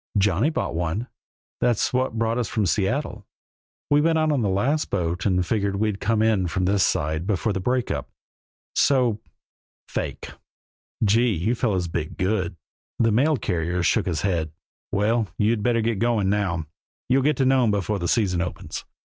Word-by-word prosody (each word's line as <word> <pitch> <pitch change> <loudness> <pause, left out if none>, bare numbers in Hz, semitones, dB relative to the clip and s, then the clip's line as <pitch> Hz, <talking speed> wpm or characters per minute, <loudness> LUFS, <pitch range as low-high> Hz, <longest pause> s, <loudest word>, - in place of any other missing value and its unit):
"Johnny 100 - +3
bought 160 - -2
one. 85 +7 -2 0.5
That's 120 -1 +1
what 130 -2 0
brought 115 +1 0
us 120 - -1
from 105 - 0
Seattle. 105 - -1 0.6
We 145 0 +5
went 165 +1 +2
out 155 -1 +2
on 140 -4 +1
the 105 - +1
last 130 +11 0
boat 90 0 -1
and 90 -2 +1
figured 100 0 0
we'd 105 0 -1
come 110 +1 +1
in 105 -5 +2
from 90 +2 -1
this 100 0 +3
side 80 +4 0
before 105 +1 0
the 95 - -2
break 125 +5 0
up. - - -4 0.6
So 125 -6 +2 0.7
fake!" - - -4 0.7
"Gee! 110 +2 +3
You 95 +9 0
fellers 100 -8 0
bit 80 -2 -4
good." 95 -2 0 0.4
The 115 -1 +3
mail 140 +7 +3
carrier 90 -3 -1
shook 105 +1 +2
his 80 -4 -1
head. 85 -5 0 0.4
"Well! 110 +2 +1
You'd 110 +1 +1
better 115 0 +1
keep 115 -3 0
going 110 -5 +1
now; 95 -6 -1 0.4
you'll 130 +2 +3
get 150 +3 +2
to 135 - +2
Nome 130 -3 +4
before 100 0 0
the 85 - -2
season 95 -6 +1
opens. 90 -1 -5
105 Hz, 170 wpm, -24 LUFS, 90-120 Hz, 0.7 s, We